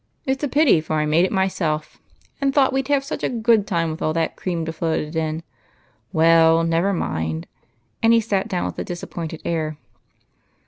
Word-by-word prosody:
It 265 0 -1
's - - -10
a - - +2
pity, 285 - +4
for 155 0 -3
I 150 0 +1
made 160 +4 +3
it - - -3
myself, 170 -5 -1 0.4
and 275 0 +2
thought 270 -2 +4
we'd 265 -1 0
have 285 -1 +2
such 275 - -5
a - - +1
good 225 -3 +2
time 165 -4 0
with 155 - -7
all 155 - 0
that 165 0 -1
cream 170 -3 -3
to 160 - -4
float 165 0 -1
it 150 +2 -7
in. 160 0 -2 0.7
Well, 165 0 +5
never 165 +4 +1
mind." 80 - -2 0.6
And 225 - +4
he 230 - +6
sat 205 -3 -1
down 185 -5 -2
with - - -5
a - - -1
disappointed 170 -2 -6
air. 155 -2 -2
170 Hz, 200 wpm, -22 LUFS, 160-225 Hz, 0.7 s, he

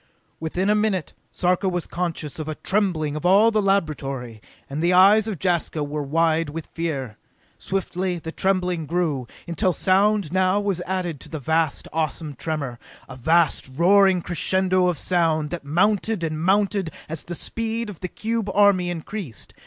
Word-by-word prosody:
Within 175 +4 -2
a 210 - +4
minute, 210 -5 0 0.2
Sarka 185 +2 +1
was 175 -2 -2
conscious 165 -4 -4
of 155 0 -4
a 155 - -3
trembling 175 -8 0
of 155 - -5
all 200 +5 +5
the 215 -1 +2
laboratory, 140 - -1 0.3
and 145 +3 -4
the 175 +2 +3
eyes 200 +4 +6
of 210 -4 -3
Jaska 170 -4 0
were 150 +1 -3
wide 160 +2 +1
with 160 +1 -6
fear. 140 -10 -3 0.4
Swiftly 185 -1 -2
the 160 -1 -6
trembling 180 -4 0
grew, 155 -7 -1 0.2
until 170 +2 +1
sound 195 -1 +2
now 185 +2 +2
was 200 -4 -1
added 180 -5 -2
to - - -12
the 160 - -4
vast, 160 +2 0
awesome 160 -1 -2
tremor 140 -4 -4 0.3
a 130 - -9
vast, 160 +2 +2
roaring 190 +2 +4
crescendo 185 +2 +1
of 175 -3 0
sound 160 -3 +1
that 175 - -4
mounted 200 +5 +1
and 155 -1 -2
mounted 195 0 +2 0.2
as 160 -1 -4
the 175 - -6
speed 230 +4 -3
of 205 -5 -9
the 180 - -3
cube 220 +2 -3
army 200 -3 +4
increased. 175 - -6
175 Hz, 165 wpm, -23 LUFS, 155-195 Hz, 0.4 s, eyes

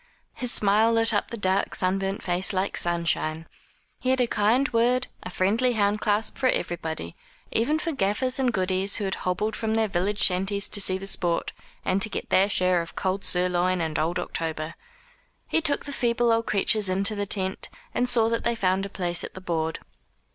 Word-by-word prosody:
His 250 -2 -1
smile 215 +2 +4
lit 225 -1 +4
up 205 - 0
the 235 - -6
dark 190 -1 0
sunburnt 195 +1 0
face 180 +2 +1
like 190 +1 -1
sunshine. 170 -2 -1 0.5
He 255 - -2
had 260 0 +2
a 250 - +4
kind 230 +5 +2
word, 245 +2 +2 0.2
a - - -6
friendly 220 +8 +1
hand 210 -1 +1
clasp 210 0 0
for 260 - +3
everybody 160 -6 -3 0.4
even 285 +8 +1
for 330 +1 -2
gaffers 255 +1 +1
and 255 -2 +2
goodies 190 -1 +1
who - - -2
had 190 - -2 0.2
hobbled 210 +4 -1
from 220 -1 -1
their 225 -1 +2
village 195 +2 -1
shanties 195 +1 +2
to 205 - 0
see 185 -1 +1
the 195 - -8
sport, 175 -3 0 0.3
and 190 +1 +1
to 220 - +1
get - - -5
their 195 +2 +4
share 185 -3 +2
of 170 - -9
cold 190 +1 -2
sirloin 180 0 +1
and 160 -2 -1
old 170 +3 0
October. 160 -2 -4 0.7
He 325 - +1
took 295 -3 0
the 285 - -6
feeble 240 -2 +1
old 230 0 +1
creatures 210 0 +1
into 195 +3 +2
the 205 -1 -3
tent, 190 -1 0 0.2
and 250 0 0
saw 230 -2 +4
that 230 0 -1
they 235 - 0
found 195 -2 0
a - - -15
place 175 -3 -2
at - - -8
the - - -6
board. 160 -3 -2
200 Hz, 200 wpm, -25 LUFS, 185-230 Hz, 0.7 s, smile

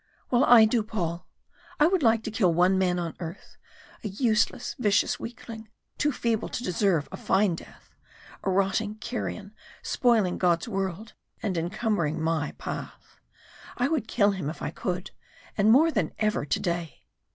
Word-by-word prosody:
"Well, 245 +1 +4
I 235 -2 +8
do, 225 +1 +2
Paul. 180 -6 -4 0.5
I 300 - +6
would 365 +1 +2
like 225 -3 +3
to 220 - -4
kill 200 -5 +2
one 180 +3 +3
man 180 -1 +1
on 170 -2 -3
earth 170 -2 -8 0.5
a - - -2
useless, 220 +3 0
vicious 205 -4 +2
weakling, 230 -2 -8 0.3
too 295 - +2
feeble 230 -4 -1
to 245 - -4
deserve 180 -5 +1
a - - -6
fine 190 -1 +2
death 165 - -12 0.5
a - - 0
rotting 195 +3 +1
carrion 215 -3 -5 0.3
spoiling 225 -7 +2
God's 175 +3 +2
world 195 0 -3 0.3
and 200 -4 -1
encumbering 175 -2 -1
my 160 -2 -1
path! - - -8 0.6
I 250 +2 +1
would 305 -9 -1
kill 205 -3 +3
him 185 -7 -3
if 155 - -7
I - - -2
could 180 0 -4 0.4
and 205 +1 +3
more 315 +7 +6
than 200 - -1
ever 215 -8 0
today." 170 0 -2
205 Hz, 160 wpm, -27 LUFS, 175-225 Hz, 0.6 s, I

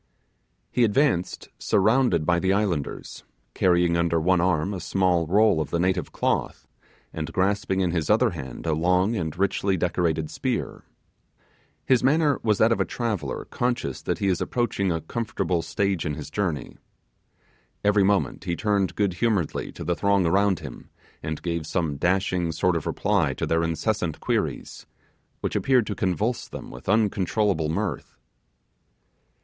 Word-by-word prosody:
He 125 - +2
advanced 110 - +1
surrounded 110 -5 +2
by 85 +1 +2
the 95 +2 +2
islanders, 95 -8 -2 0.3
carrying 90 -2 +3
under 85 -1 +1
one 90 +2 +2
arm 90 +1 +1
a 95 - -4
small 90 -3 +1
roll 100 -2 +4
of 75 - -5
native 90 -1 0
cloth, - - -2 0.5
and 80 -1 -4
grasping 95 0 0
in 90 -2 +1
his 85 -2 -2
other 115 +2 +4
hand 70 -6 -8
a 80 - +1
long 90 +7 +2
and 80 -4 -3
richly 95 0 +1
decorated 80 -3 0
spear. - - -3 1.0
His 130 -2 +3
manner 145 +1 +3
was 105 -3 +2
that 110 +2 +4
of 115 - +1
a - - +4
traveller 105 - -3
conscious 120 - -2
that - - -2
he - - -2
is 90 -3 +1
approaching 105 -6 0
a 80 -1 -1
comfortable 95 -2 -2
stage 100 -2 -1
in 75 - -2
his 75 -1 -8
journey. 90 -7 -3 1.1
Every 105 -1 +4
moment 100 0 0
he 85 -2 -1
turned 100 -4 0
good 100 -3 +1
humouredly 100 -5 -1
on - - -5
the 85 +1 0
throng 100 -1 +2
around 95 +2 +2
him, - - -10 0.3
and 80 0 -5
gave 85 -3 -2
some 80 -6 -1
dashing 90 0 +1
sort 90 +3 +1
of 80 - -2
reply - - +1
to - - -2
their 80 0 +1
incessant 85 +1 -1
queries, - - -3 0.5
which - - -2
appeared 130 -4 +3
to 105 - -3
convulse 105 +6 -1
them - - -9
with 60 +7 -9
uncontrollable 100 -5 +1
mirth. 80 - -3
95 Hz, 155 wpm, -25 LUFS, 85-105 Hz, 1.1 s, roll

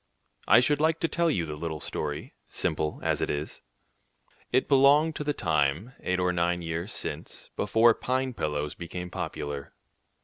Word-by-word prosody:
I - - +7
should 145 +4 +2
like 160 +1 +2
to 165 - +2
tell 170 0 +1
you 90 - 0
the 75 -1 -5
little 80 0 -4
story, 75 0 -4 0.2
simple 75 0 -1
as - - +1
it - - 0
is. 75 +1 -4 0.9
It 130 +1 +2
belongs 145 +3 +5
to - - -3
the 145 - 0
time, 80 - 0
eight 90 0 -1
or 90 0 +1
nine 85 0 0
years 85 +4 -3
since, - - -5
before 115 +3 +4
pine 130 +2 -1
pillows 75 -6 -2
became 90 +1 -6
popular. 70 -3 -5
90 Hz, 165 wpm, -28 LUFS, -, 0.9 s, I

